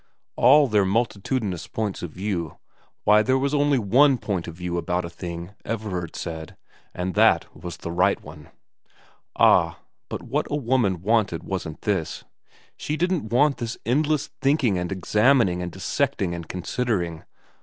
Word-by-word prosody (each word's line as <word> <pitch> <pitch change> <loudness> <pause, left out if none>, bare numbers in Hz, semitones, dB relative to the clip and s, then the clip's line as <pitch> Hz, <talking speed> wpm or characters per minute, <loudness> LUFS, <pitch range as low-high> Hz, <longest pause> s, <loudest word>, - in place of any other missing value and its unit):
All 145 +4 +6
their 105 -4 +3
multitudinous 100 -2 -1
points 105 -3 -3
of 90 - -4
view, 90 -2 -4 0.5
why, 105 0 +6
there 130 +4 +2
was 140 +2 0
only 145 -1 +3
one 130 +5 +4
point 100 -7 -3
of 85 - -7
view 90 0 -3
about 90 +1 -1
a - - -6
XI 85 - -23
VERA 85 -2 -4
109 - - -14
thing, - - -28 0.2
Everard 95 -7 -4
said, 80 -1 -6 0.3
and 90 +1 -3
that - - +3
was 85 +1 -7
the 85 - -6
right 90 +3 +2
one. - - -13 0.9
Ah, - - +4 0.3
but - - -5
what - - -1
a - - -1
woman 115 - +1
wanted 105 -5 +1
wasn't 90 -5 -5
this; 95 -7 -1 0.5
she 150 - -3
didn't 175 -9 0
want 140 +4 +3
this 120 -1 -4
endless 150 +4 +1
thinking 135 - +2
and 90 +1 -3
examining 105 0 +3
and 90 0 -4
dissecting 85 +1 -1
and 85 -2 -6
considering. 90 -3 -2
100 Hz, 165 wpm, -24 LUFS, 90-125 Hz, 0.9 s, All